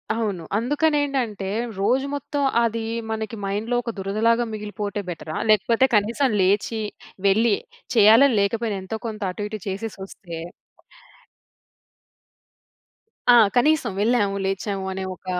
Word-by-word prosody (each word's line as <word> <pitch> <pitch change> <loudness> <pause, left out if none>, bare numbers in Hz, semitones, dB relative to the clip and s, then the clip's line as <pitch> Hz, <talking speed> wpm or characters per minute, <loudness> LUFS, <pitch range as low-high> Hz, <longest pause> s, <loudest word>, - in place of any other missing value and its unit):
అవును. 205 -7 -2
అందుకనేంటంటే, 275 -5 0 0.3
రోజు 250 +7 +2
మొత్తం 285 0 -2 0.2
అది, 230 -1 0 0.3
మనకి 220 0 -3
మైండ్‌లో 210 +5 -2
ఒక 235 - -3
దురదలాగా 220 +5 +1
మిగిలిపోతే 210 -1 -4
బెటరా? 160 -2 -5
లేకపోతే 220 +4 +4
కనీసం 230 +6 +2
లేచి, 205 +4 +1 0.5
వెళ్ళి, 215 +2 +4 0.4
చేయాలని 225 +3 +6
లేకపోయినా 215 0 -1
ఎంతో 220 +3 -5
కొంత 215 -1 -6
అటు, 205 +3 -4
ఇటు 215 - -5
చేసేసొస్తే 195 -3 -6 2.9
ఆ! - - +8 0.2
కనీసం 300 -2 +3
వెళ్ళాము, 210 -3 +2
లేచాము 195 0 -2
అనే 190 - -4
ఒక 185 - -18
215 Hz, 110 wpm, -23 LUFS, 200-235 Hz, 2.9 s, ఆ